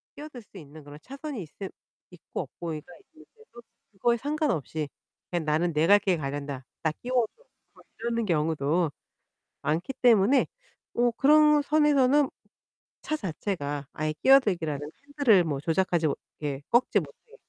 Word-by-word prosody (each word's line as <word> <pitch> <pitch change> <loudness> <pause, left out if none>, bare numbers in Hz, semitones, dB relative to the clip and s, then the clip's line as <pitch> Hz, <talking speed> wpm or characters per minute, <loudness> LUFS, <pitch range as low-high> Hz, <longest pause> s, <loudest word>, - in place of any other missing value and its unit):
끼어들 295 -4 -9
수 205 -2 -16
있는 155 -1 -12
그런 145 +1 -12
차선이 275 -2 -7
있을 190 +4 -8 0.4
있고 - - -6
없고가 170 -2 -6
있는데도 240 - -14 0.3
그거에 235 +5 +1
상관없이 225 - -2 0.4
"그냥 175 -3 -1
나는 160 +3 +1
내 155 +2 +2
갈 205 +1 +7
길 190 -4 +1
가련다. 140 -2 -5 0.2
나 160 - +2
끼워줘." 245 -3 0 0.7
이러는 230 0 -1
경우도 160 -1 +1 0.7
많기 165 +11 -1
때문에 240 +2 +5 0.5
어 240 0 +3
그런 300 +3 +5
선에서는 290 -2 +3 0.7
차 310 - -2
자체가 155 - -4
아예 155 0 -2
끼어들기라는 170 - +3 0.2
핸들을 270 -10 +4
뭐 145 -4 -2
조작하지 170 0 +1
못하게 145 -1 -5
꺾지 240 +2 +3
못하게 470 0 -12
190 Hz, 305 characters per minute, -27 LUFS, -, 0.7 s, 갈